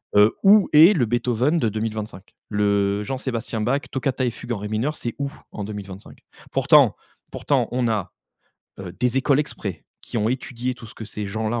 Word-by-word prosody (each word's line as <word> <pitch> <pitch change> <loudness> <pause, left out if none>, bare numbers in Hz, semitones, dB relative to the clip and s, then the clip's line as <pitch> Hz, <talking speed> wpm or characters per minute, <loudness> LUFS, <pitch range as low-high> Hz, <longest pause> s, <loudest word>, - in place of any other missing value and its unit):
Heu, 105 +2 +5
où 200 0 +6
est 165 +7 +8
le 125 - +1
Beethoven 120 +6 +1
de 115 -9 +1
2025? 110 -2 -5
Le 100 -1 +1
Jean-Sébastien 120 -2 -3
Bach, 135 +6 +1
Toccata 130 0 -1
et 125 - +2
fugue 120 +1 -8
en 115 - -1
ré 105 +1 -5
mineur, 115 +9 -1
c'est 120 -5 -5
où, 140 0 -3 0.2
en 105 - -6
2025? 100 -2 -8 0.3
Pourtant - - +5 0.4
pourtant, - - 0
on 125 -1 0
a, 110 -5 -2 0.7
heu, 95 -2 -7
des 125 +1 +1
écoles 135 +1 +2
exprès, 100 - -4 0.2
qui - - -7
ont 110 +1 +1
étudié 125 -1 -3
tout 120 -2 -12
ce - - -12
que 110 - -8
ces 105 -1 -5
gens-là 110 +3 -2
115 Hz, 185 wpm, -23 LUFS, 105-130 Hz, 0.7 s, est